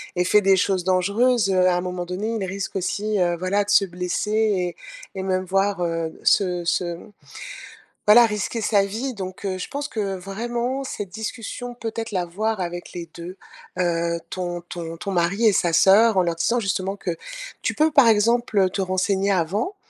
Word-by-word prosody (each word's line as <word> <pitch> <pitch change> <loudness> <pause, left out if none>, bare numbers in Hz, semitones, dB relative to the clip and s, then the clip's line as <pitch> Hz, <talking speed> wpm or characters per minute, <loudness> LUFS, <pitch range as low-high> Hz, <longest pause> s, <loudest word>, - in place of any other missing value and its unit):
et 180 - +2
fait 210 +3 +4
des 195 -1 +4
choses 185 -1 +1
dangereuses, 200 +4 +2
heu, 185 -1 +4
à 180 - +2
un 180 - -1
moment 180 -1 -4
donné, 190 +5 -3
il 200 -3 -2
risque 195 +1 -5
aussi, 205 +2 -1
heu, 175 -1 +2
voilà, 185 +3 +1
de 200 - -10
se 195 - +5
blesser 180 +3 -3
et 200 -6 +1 0.4
et 190 - -3
même, 185 0 -1
voire, 195 0 0
heu, 165 -1 -1
d - - -17
se 180 -3 +2
se, 170 - +1
mmh, 210 - -14 1.0
voilà, 235 +3 +8
risquer 210 +1 -2
sa 205 -2 +3
vie, 235 +7 -4
donc, 190 -1 -7
heu, 185 -1 -2
je - - -4
pense 290 +1 -4
que 200 -7 -3
vraiment 240 +7 -3
cette 205 -7 -5
discussion, 230 +3 -6
peut-être 225 -1 -5
l'avoir 195 +4 -2
avec 175 0 -5
les 170 -1 -6
2, 175 +3 -8 0.4
heu, 170 -1 0
ton 175 -1 -4
ton 165 -1 -7
ton 200 +3 -5
mari 185 +6 +1
et 210 - +6
sa 170 -3 +1
sœur, 205 +4 +5
en 185 - +5
leur 170 -1 -1
disant, 235 +9 +1
justement, 195 -1 -2
que 175 -4 -4 0.5
tu - - -1
peux, 310 +1 +3
par 280 -5 +6
exemple, 225 +1 +2
heu, 190 -1 +4
te 195 - -2
renseigner 190 +1 0
avant 195 - -1
195 Hz, 195 wpm, -23 LUFS, 180-215 Hz, 1.0 s, voilà